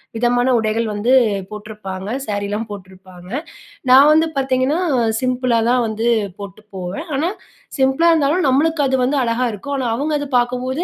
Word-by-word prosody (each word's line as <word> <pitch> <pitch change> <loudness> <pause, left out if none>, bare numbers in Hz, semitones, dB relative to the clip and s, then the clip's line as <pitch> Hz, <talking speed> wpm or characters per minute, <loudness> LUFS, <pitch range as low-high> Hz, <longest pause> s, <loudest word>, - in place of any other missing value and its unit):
விதமான 245 +2 +1
உடைகள் 220 0 0
வந்து 215 +5 0 0.4
போட்ருப்பாங்க. 210 -2 -7 0.2
சாரிலாம் 205 +2 -3
போட்ருப்பாங்க. 185 -2 -12 0.6
நான் 275 +3 +8
வந்து 320 +1 +4
பாத்தீங்கன்னா, 265 +3 +1 0.4
சிம்பிளா 255 -2 0
தான் 250 0 +3
வந்து 220 +1 -3 0.3
போட்டு 200 -1 -9 0.2
போவேன். 185 - -5
ஆனா 315 +6 0 0.5
சிம்ப்ளா 270 +6 +3
இருந்தாலும் 310 +2 +2
நம்ளுக்கு 305 +4 +2
அது 265 0 +1
வந்து 275 +3 0
அழகா 245 +1 0
இருக்கும். 280 +8 -6
ஆனா 260 -2 -2
அவுங்க 295 +5 -1
அது 290 -1 -5
பாக்கும்போது 250 +5 -1
245 Hz, 145 wpm, -19 LUFS, 210-275 Hz, 0.6 s, நான்